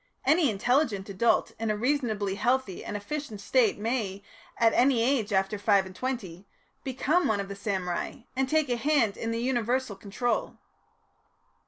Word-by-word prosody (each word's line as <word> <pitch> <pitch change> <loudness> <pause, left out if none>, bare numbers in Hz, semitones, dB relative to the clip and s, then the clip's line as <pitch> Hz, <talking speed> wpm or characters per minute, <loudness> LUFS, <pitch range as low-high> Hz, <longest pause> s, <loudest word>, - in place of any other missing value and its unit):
Any 315 -3 +4
intelligent 220 -1 +1
adult 200 +4 +2
in 225 -1 -1
a 210 - 0
reasonably 220 -6 0
healthy 240 0 0
and 210 - -4
efficient 260 +1 -5
state 455 - +2
may, 210 -3 -2 0.3
at 225 -1 +4
any 250 -2 +4
age 240 -5 +1
after 195 +1 +1
five 200 -2 +3
and 185 0 -11
twenty, 200 -7 -5 0.4
become 280 +7 +1
one 215 -2 +1
of 200 0 -4
the 200 - -5
samurai, 190 -2 -3
and 265 0 0
take 310 -2 +2
a 245 - +1
hand 250 -6 +2
in 225 - -4
the 230 - -1
universal 245 -2 0
control." 215 +4 -2
230 Hz, 160 wpm, -28 LUFS, 200-260 Hz, 0.4 s, Any